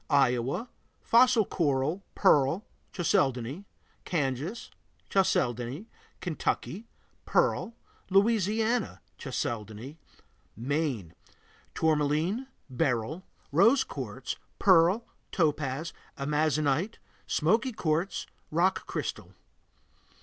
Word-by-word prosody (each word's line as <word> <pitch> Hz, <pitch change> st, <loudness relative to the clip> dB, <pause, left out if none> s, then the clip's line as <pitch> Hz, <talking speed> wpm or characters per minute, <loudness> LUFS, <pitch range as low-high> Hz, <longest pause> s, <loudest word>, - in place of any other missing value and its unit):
Iowa 135 Hz, -, +2 dB, 0.4 s
Fossil 240 Hz, -2 st, +5 dB
coral, 150 Hz, +1 st, 0 dB
pearl, 145 Hz, +8 st, +3 dB, 0.3 s
chalcedony. 140 Hz, -, 0 dB, 0.4 s
Kansas 150 Hz, -, -2 dB, 0.4 s
Chalcedony. 125 Hz, -, +1 dB, 0.4 s
Kentucky 180 Hz, +4 st, -2 dB, 0.4 s
Pearl. 485 Hz, -, +1 dB, 0.3 s
Louisiana 220 Hz, +3 st, +2 dB, 0.2 s
Chalcedony. 120 Hz, +2 st, -4 dB, 0.6 s
Maine 125 Hz, -, -2 dB, 0.6 s
Tourmaline, 160 Hz, -, +1 dB, 0.2 s
beryl, 130 Hz, +3 st, -1 dB, 0.3 s
rose 225 Hz, -, +5 dB
quartz, -, -, -5 dB, 0.2 s
pearl, 185 Hz, +3 st, +5 dB, 0.3 s
topaz, 150 Hz, -2 st, 0 dB, 0.2 s
amazonite, 150 Hz, +5 st, +1 dB, 0.3 s
smoky 225 Hz, -, +2 dB
quartz, 170 Hz, -2 st, -1 dB, 0.2 s
rock 175 Hz, +4 st, +1 dB
crystal. -, -, -4 dB
155 Hz, 70 wpm, -29 LUFS, 135-195 Hz, 0.6 s, Fossil